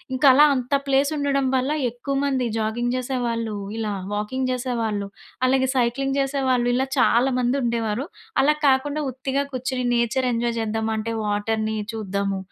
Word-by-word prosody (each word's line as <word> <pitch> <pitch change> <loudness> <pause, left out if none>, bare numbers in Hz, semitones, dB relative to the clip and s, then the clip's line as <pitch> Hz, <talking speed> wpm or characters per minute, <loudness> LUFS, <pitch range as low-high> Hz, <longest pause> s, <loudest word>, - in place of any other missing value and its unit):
ఇంకా 275 +2 +4
అలా 295 +3 +7
అంత 255 +2 -3
ప్లేస్ 275 +2 +3
ఉండడం 275 -1 +1
వల్ల 260 +3 0 0.2
ఎక్కువ 260 +4 -4
మంది 260 -3 0
జాగింగ్ 240 +3 -1
చేసేవాళ్ళు, 235 -4 -2 0.2
ఇలా 210 -2 -2 0.2
వాకింగ్ 255 +5 -2
చేసేవాళ్ళు, 230 -5 -2 0.4
అలాగే 260 0 +2
సైక్లింగ్ 270 +3 0
చేసేవాళ్ళు, 265 -3 +1
ఇలా 265 +1 +1
చాలా 245 +3 +4
మంది 245 +2 +1
ఉండేవారు. 230 +1 -1 0.3
అలా 295 +3 +5
కాకుండా 285 +3 +2
ఉత్తిగా 265 +2 -2
కుర్చుని 255 0 -2
నేచర్ 235 +2 +1
ఎంజాయ్ 235 0 -1
చేద్దాం 220 0 -2
అంటే 215 +1 -3 0.2
వాటర్‌ని 215 +1 -1 0.2
చూద్దాము, 200 -2 -2
245 Hz, 145 wpm, -23 LUFS, 225-265 Hz, 0.4 s, అలా